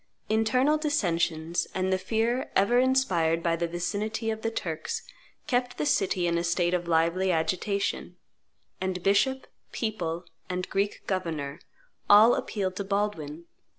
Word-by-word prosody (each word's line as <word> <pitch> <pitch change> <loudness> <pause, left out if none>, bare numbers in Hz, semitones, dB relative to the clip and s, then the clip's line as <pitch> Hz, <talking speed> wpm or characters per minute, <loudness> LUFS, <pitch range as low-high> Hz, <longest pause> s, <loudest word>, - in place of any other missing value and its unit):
Internal 255 +7 +2
dissensions 170 - 0
and 190 0 +1
the 185 - +1
fear 225 +6 0
ever 220 +6 +4
inspired 185 -11 +2
by 170 -1 +2
the 170 0 -1
vicinity 210 +6 -2
of 220 0 -5
the 225 - 0
Turks 170 -8 -4 0.4
kept 245 -3 0
the 150 - -1
city 185 +1 +1
in 170 0 +1
a - - -2
state 175 +1 +1
of 175 -1 -1
lively 170 +3 +2
agitation; 185 +4 -1 0.6
and 185 -1 -2
bishop, 215 +7 +2 0.3
people, 180 -7 -3 0.2
and 180 0 -2
Greek 200 +1 -1
governor, 160 -7 -3 0.5
all 215 +4 +8
appealed 190 -3 -2
to 200 - -2
Baldwin. 190 -6 -2
190 Hz, 140 wpm, -27 LUFS, 170-220 Hz, 0.6 s, all